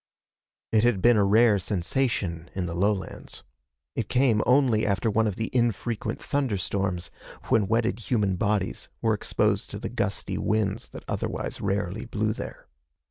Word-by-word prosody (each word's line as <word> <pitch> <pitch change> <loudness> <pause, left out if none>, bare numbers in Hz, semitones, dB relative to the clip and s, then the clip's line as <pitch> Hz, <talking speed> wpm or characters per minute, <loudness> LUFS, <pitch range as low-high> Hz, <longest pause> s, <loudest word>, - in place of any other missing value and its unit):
It 110 -1 +4
had 120 -5 +3
been 120 +5 +5
a 105 - +4
rare 105 +1 +5
sensation 90 -3 -1
in 95 -2 -1
the 85 - -4
lowlands. 95 +2 -2 0.5
It 115 - -2
came 125 -4 +3
only 125 -4 +4
after 105 +2 +1
one 110 +1 +2
of 105 - -2
the 110 +2 -3
infrequent 115 -2 0
thunderstorms, 100 -8 -1 0.4
when 105 -3 +3
wetted 115 +2 +1
human 105 -6 +2
bodies 100 -1 -1
were 110 -1 +2
exposed 105 - 0
to - - -5
the - - -5
gusty - - -2
winds 105 -2 0
that - - -10
otherwise - - -3
rarely 100 0 -1
blew 110 +1 -1
there. - - -8
105 Hz, 150 wpm, -26 LUFS, 95-115 Hz, 0.5 s, been